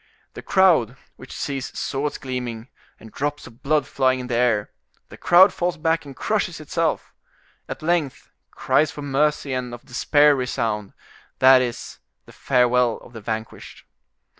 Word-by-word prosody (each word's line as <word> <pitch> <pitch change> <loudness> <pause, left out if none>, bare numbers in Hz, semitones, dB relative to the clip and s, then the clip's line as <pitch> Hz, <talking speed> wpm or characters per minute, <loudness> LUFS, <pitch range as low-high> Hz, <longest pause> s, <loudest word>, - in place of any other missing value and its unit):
The - - -9
crowd, 160 - +3 0.2
which 130 - -13
sees 135 -2 -5
swords 145 +1 -3
gleaming, 125 -2 -6 0.3
and 110 - -14
drops 145 +4 -4
of 115 - -15
blood 150 +1 +1
flying 130 -1 +1
in 125 - -6
the 125 - -5
air—the 115 -4 -3
crowd 185 +3 +5
falls 175 0 -2
back 160 0 0
and 140 -2 -10
crushes - - -2
itself. - - -2 0.6
At - - -7
length 165 -5 -1 0.2
cries 155 - +1
for 145 - -8
mercy 145 0 0
and 125 -1 -4
of 120 - -17
despair 145 +3 +3
resound; 115 -6 -3 0.4
that 130 0 +6
is, 120 -2 -5 0.3
the - - -16
farewell 125 -2 +2
of 120 - -16
the 115 - -9
vanquished. 110 +1 -7
130 Hz, 150 wpm, -22 LUFS, 120-145 Hz, 0.6 s, that